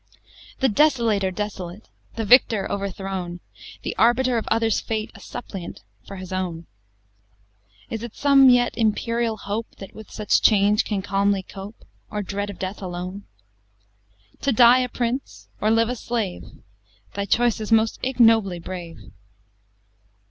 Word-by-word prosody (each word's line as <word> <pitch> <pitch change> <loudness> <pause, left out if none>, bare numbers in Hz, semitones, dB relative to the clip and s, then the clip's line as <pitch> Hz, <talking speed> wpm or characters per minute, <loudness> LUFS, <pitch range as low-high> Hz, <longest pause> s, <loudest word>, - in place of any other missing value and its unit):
V 265 - +4
The 225 - -1
Desolator 230 -9 +3
desolate! 195 -1 -6 0.3
The 225 - -2
Victor 225 -2 +5
overthrown! 190 -3 -4 0.4
The - - -4
Arbiter 240 +1 +3
of - - -8
others' 225 -1 +1
fate 220 -1 -3
A - - -13
Suppliant 195 - -8 0.2
for 195 - -8
his 185 -1 -8
own! 175 -3 -3 1.3
Is 225 - -3
it 235 -2 -8
some 275 -2 +6
yet 245 -1 +3
imperial 230 0 0
hope 210 +3 -5
That 195 - -11
with 220 -1 -12
such 210 -1 +1
change 210 0 +4
can 200 -3 -2
calmly 200 0 +1
cope? 195 +4 -11 0.2
Or 210 -1 -3
dread 200 +1 -4
of 200 - -8
death 190 +3 -5
alone? 185 +2 -6 1.2
To 275 - +1
die 245 +1 +7
a 250 -1 -1
prince 245 +3 -4
or 215 - +2
live 225 +1 +3
a 250 - -2
slave 225 -6 -3 0.7
Thy 200 0 -2
choice 235 +2 +1
is 215 - -5
most 225 0 +3
ignobly 225 -7 +3
brave! 170 -2 -7
210 Hz, 145 wpm, -23 LUFS, 195-235 Hz, 1.3 s, die